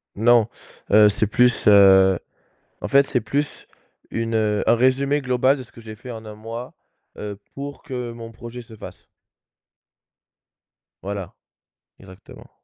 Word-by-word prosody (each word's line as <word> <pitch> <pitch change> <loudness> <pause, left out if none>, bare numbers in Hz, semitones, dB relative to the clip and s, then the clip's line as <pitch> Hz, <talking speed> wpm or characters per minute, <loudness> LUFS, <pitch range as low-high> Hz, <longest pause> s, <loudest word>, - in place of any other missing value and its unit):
Non, 115 +1 +4 0.4
heu, 105 0 +7
c'est 105 +1 +1
plus 125 +2 +2
heu, 95 -2 +6 0.6
en - - -4
fait 140 0 +4
c'est 125 - 0
plus 145 +7 -3 0.4
une, 115 0 -3
heu 105 -2 +1
un - - +5
résumé 135 +4 +2
global 130 +1 +1
de - - -7
ce 120 - -18
que 115 - -14
j'ai 110 -1 -9
fait 125 +4 -11
en 110 -1 -8
1 105 -1 -9
mois, 115 +3 -8 0.5
heu, 105 -1 -6 0.2
pour 140 +1 -7
que 125 -5 -5
mon 115 -1 -10
projet 120 +2 -9
se 115 -1 -15
fasse. - - -12 2.0
Voilà, 100 -2 -5 0.7
exactement. 95 0 -15
115 Hz, 145 wpm, -22 LUFS, 105-125 Hz, 2.0 s, heu